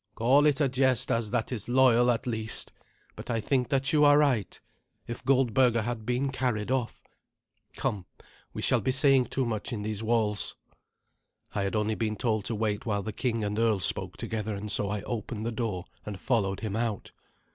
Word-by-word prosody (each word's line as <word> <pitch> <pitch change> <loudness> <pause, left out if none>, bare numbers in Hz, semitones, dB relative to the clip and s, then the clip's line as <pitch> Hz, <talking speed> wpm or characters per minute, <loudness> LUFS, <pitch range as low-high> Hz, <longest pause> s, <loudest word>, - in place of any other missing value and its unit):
"Call 135 +6 +4
it 145 -1 +2
a 145 - +3
jest, 130 -2 +1
as 115 -2 0
that 120 +1 -1
is 115 -2 -4
loyal, 125 -1 +5
at 120 +2 0
least. 110 -3 -3 0.4
But - - -10
I 115 -2 0
think 125 +3 0
that 135 +1 +1
you 150 -1 +5
are 145 0 +7
right. 135 -9 +1 0.5
If 120 - -7
Goldberga 125 -3 +3
had 120 -1 -4
been 125 +2 0
carried 125 -4 -1
off 130 -3 -2 0.7
Come, 95 -4 -3 0.4
we - - -6
shall - - +2
be 130 - -1
saying 135 -1 +4
too 130 +2 -1
much 110 -3 -3
in 105 -4 -4
these 110 0 -3
walls." 110 -2 0 1.0
I 100 - -1
had 100 +2 -1
only 105 0 +1
been 110 -1 -2
told 110 -3 -1
to 115 - -2
wait 105 -1 -1
while 100 -3 -1
the 110 - -5
king 115 -1 -1
and 105 +1 -2
earl 115 -3 +2
spoke - - +1
together, 110 -1 -3
and 105 +1 -5
so 100 +2 +1
I 105 -1 -3
opened 115 -1 -4
the 115 - -1
door 110 -6 -3 0.2
and 100 -2 -7
followed 100 -6 0
him 105 -2 -3
out. 115 -3 -2
115 Hz, 195 wpm, -28 LUFS, 105-125 Hz, 1.0 s, are